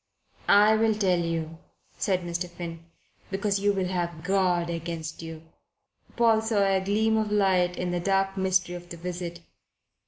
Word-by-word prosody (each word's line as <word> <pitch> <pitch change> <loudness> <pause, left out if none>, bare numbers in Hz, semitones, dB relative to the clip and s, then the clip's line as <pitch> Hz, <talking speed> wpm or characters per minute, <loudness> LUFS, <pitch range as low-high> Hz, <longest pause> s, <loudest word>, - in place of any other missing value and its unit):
"I 210 +2 +6
will 220 0 +2
tell 190 -4 +2
you," 165 -1 -3 0.4
said 185 -2 0
Mr. 175 0 -3
Finn. 165 -1 -8 0.4
"Because 200 +1 0
you 205 +1 +3
will 195 -2 -1
have 170 -3 -3
God 180 -2 +1
against 165 -1 -5
you." 160 -1 -8 0.7
Paul 225 -2 +4
saw 220 -2 +1
a 190 -1 +2
gleam 220 +3 +2
of 215 -1 -1
light 185 -3 +2
in 180 0 -2
the 175 - -1
dark 195 +1 +1
mystery 185 -2 +1
of 175 0 -9
the 170 - -7
visit. 175 0 -5
180 Hz, 160 wpm, -27 LUFS, 170-200 Hz, 0.7 s, I